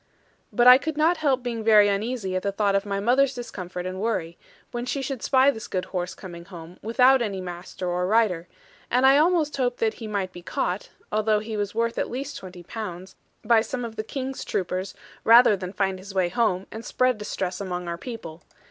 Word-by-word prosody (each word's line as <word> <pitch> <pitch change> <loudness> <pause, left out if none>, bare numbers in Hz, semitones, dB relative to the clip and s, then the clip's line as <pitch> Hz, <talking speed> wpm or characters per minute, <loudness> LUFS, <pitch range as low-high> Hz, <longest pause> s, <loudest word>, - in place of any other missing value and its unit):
But 240 - +3
I 250 +1 +10
could 315 +1 -4
not 325 +3 +3
help 275 -5 +1
being 235 -2 -3
very 215 -2 +6
uneasy 205 -1 -1
at 185 - 0
the 200 - -1
thought 200 0 +1
of 195 +1 0
my 200 -1 -1
mother's 260 +5 +3
discomfort 185 -7 -6
and 185 +1 -4
worry, 180 -7 -1 0.4
when 240 0 -3
she 255 +3 -2
should 265 -3 -4
spy 265 +1 +4
this 220 -5 -8
good 185 -1 -2
horse 180 -1 -4
coming 170 -3 -10
home, 175 -2 -11
without 250 +4 +4
any 200 -4 -2
master, 180 0 -6
or 180 +1 0
rider, 195 -5 +2 0.4
and 250 +2 +3
I 270 +2 +7
almost 315 -3 +2
hoped 245 -2 0
that 220 -1 +1
he 225 - -8
might 200 -3 -2
be 175 - -10
caught 180 +2 -3 0.2
(although 215 0 +2
he 215 +1 -4
was 205 0 -3
worth 230 0 0
at - - -1
least 270 +4 -5
twenty 180 -2 -10
pounds) 185 -2 -7 0.3
by 225 0 +5
some 245 +1 -4
of 225 -1 -7
the 215 - -3
King's 265 +3 -5
troopers, 185 +1 -3 0.3
rather 230 -1 +7
than 185 -1 -6
find 190 -1 -1
his 195 +1 -10
way 185 -2 +2
home, 195 -2 0
and 220 - -7
spread 255 -2 +1
distress 190 -2 -3
among 180 -2 -4
our 170 0 -4
people. 175 -9 -8
210 Hz, 210 wpm, -25 LUFS, 185-245 Hz, 0.4 s, I